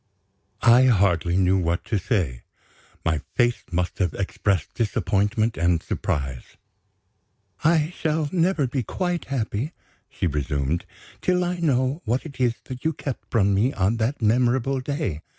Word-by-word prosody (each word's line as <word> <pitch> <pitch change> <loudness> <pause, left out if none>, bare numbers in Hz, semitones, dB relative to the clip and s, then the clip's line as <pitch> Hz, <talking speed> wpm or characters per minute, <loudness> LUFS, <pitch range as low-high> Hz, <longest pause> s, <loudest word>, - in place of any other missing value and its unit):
I 120 +2 +7
hardly 90 -7 +3
knew 95 0 +3
what 85 0 -1
to 110 - 0
say. 85 - -1 0.6
My 80 -3 +1
face 120 0 +2
must 90 0 -1
have 90 -5 0
expressed 95 -3 -1
disappointment 110 0 0
and 85 0 +2
surprise. 65 -4 -3 1.1
"I 160 0 +3
shall 155 -1 0
never 175 -4 +2
be 130 +1 -1
quite 175 - -2
happy," 130 +2 -2 0.4
she - - -3
resumed, 75 0 -1 0.3
"till 180 0 +2
I 180 0 -1
know 135 -1 +1
what 120 +5 -1
it 140 -4 -10
is 120 -2 +2
that 130 -1 -8
you 160 0 +1
kept 135 -4 -6
from 100 -3 +3
me 115 +8 +2
on 100 +4 +1
that 115 +3 -1
memorable 125 +4 +2
day. 130 - -3
115 Hz, 145 wpm, -24 LUFS, 90-135 Hz, 1.1 s, I